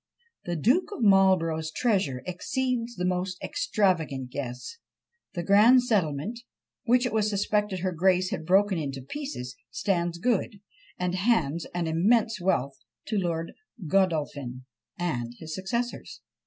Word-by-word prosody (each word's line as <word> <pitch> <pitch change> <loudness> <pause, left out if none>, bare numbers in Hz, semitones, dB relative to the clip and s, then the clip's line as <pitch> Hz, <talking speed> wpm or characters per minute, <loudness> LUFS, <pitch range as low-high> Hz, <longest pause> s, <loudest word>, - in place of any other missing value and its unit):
"The 175 - -2
Duke 245 - +2
of 245 - -4
Marlborough's 185 -6 +4
treasure 155 - 0
exceeds 240 +5 -2
the 180 -2 -2
most 180 0 -1
extravagant 170 - 0
guess. 125 - -6 0.6
The 175 - -2
grand 220 +7 +6
settlement, 205 - 0 0.5
which 245 +1 +3
it 250 - -2
was 215 -1 +2
suspected 205 -2 0
her 185 0 0
grace 185 +2 +2
had - - -3
broken 185 -4 +2
to 135 - -6
pieces, 135 - -6
stands 170 -1 -1
good, 215 0 0 0.4
and 180 0 -1
hands 180 -6 +1
an 175 -1 0
immense 210 +6 +2
wealth 140 -7 0 0.3
to 215 -2 +1
Lord 165 -2 -2 0.3
Godolphin 145 -8 0 0.3
and 120 -9 -3
his 160 -1 -7
successors. 235 +7 -4
185 Hz, 130 wpm, -27 LUFS, 160-215 Hz, 0.6 s, grand